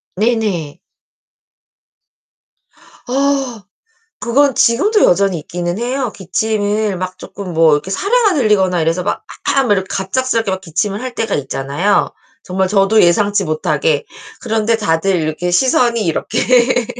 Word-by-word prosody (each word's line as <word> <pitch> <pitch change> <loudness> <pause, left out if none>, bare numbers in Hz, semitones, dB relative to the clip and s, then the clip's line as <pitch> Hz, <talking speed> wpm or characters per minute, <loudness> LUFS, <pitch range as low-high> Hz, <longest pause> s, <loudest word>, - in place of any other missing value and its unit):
네네. 205 -8 -1 2.3
아. 270 -4 -1 0.6
그건 270 +3 +2
지금도 400 - +3
여전히 190 -1 +2
있기는 175 +4 -4
해요. 250 0 -2
기침을 205 +1 -1
막 185 0 -5
쪼끔 190 -3 -8
뭐 160 -1 +4
이렇게 150 +6 -3
사레가 415 - +2
들리거나 195 - +2
이래서 165 +3 0
막 205 - -3 0.2
"아악." 270 -5 +1
이렇게 190 -2 +1
갑작스럽게 225 +2 -1
막 190 0 -3
기침을 195 +6 -2
할 255 -1 -6
때가 225 -2 -2
있잖아요, 145 +8 0 0.3
정말 190 +1 -1
저도 200 +2 +3
예상치 200 +3 +2
못하게. 155 -2 0 0.4
그런데 225 0 0
다들 190 -2 0
이렇게 160 +2 -2
시선이 235 +2 +2
이렇게 245 +8 +1
205 Hz, 290 characters per minute, -16 LUFS, 180-235 Hz, 2.3 s, 뭐